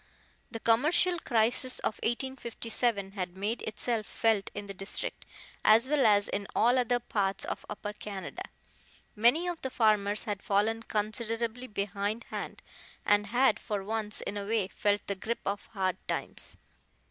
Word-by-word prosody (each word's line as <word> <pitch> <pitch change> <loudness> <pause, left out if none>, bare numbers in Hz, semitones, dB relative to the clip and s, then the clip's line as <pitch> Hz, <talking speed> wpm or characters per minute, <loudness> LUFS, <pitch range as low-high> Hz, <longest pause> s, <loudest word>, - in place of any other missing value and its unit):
The 225 - -6
commercial 305 +11 +3
crisis 245 0 +1
of 215 - -2
1857 235 -4 -1
had 185 -2 -4
made 210 +5 -1
itself 220 +1 -2
felt 220 -4 +1
in 205 - -4
the 200 - -7
district, 195 +1 -4 0.4
as 225 +4 +6
well 285 -4 +4
as 205 -1 +4
in 200 0 -3
all 245 +3 +4
other 245 0 +2
parts 200 -5 -1
of - - -5
Upper 205 0 -5
Canada. 205 -2 -6 0.7
Many 245 +11 +4
of 350 -2 -3
the 265 - -2
farmers 210 -4 +2
had 205 -2 -3
fallen 215 +3 +1
considerably 230 +3 -2
behindhand, 205 +1 -3 0.4
and 205 0 +4
had 245 0 +3
for 205 -2 -3
once 215 0 -1
in 205 - -4
a 200 - -3
way 215 -3 +1
felt 205 +1 0
the 200 - -1
grip 220 +4 -3
of 200 +1 -2
hard 190 -3 -1
times. - - -4
215 Hz, 150 wpm, -30 LUFS, 205-235 Hz, 0.7 s, as